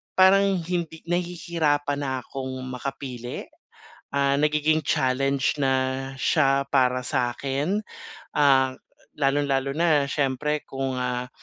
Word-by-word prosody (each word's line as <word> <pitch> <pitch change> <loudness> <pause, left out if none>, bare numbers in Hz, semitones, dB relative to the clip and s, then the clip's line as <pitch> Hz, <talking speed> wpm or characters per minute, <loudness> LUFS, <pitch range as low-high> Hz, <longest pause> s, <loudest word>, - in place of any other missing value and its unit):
parang 195 0 +5
hindi 170 -2 -3
nahihirapan 165 -5 0
na 130 -2 -2
akong 130 -1 -6 0.2
makapili, 125 -1 -5 0.7
ah, 140 0 +2
nagiging 150 +1 +2
challenge 135 0 +1
na 135 -1 +3 0.4
siya 140 -2 +2
para 125 -2 +3
sa'kin, 135 +10 -1 0.6
ah, 135 -3 +4 0.4
lalong-lalo 140 -1 +1
na 160 -4 +3
siyempre 145 +2 0
kung, 135 0 -2
ah, 125 0 -2
140 Hz, 100 wpm, -25 LUFS, 130-155 Hz, 0.7 s, parang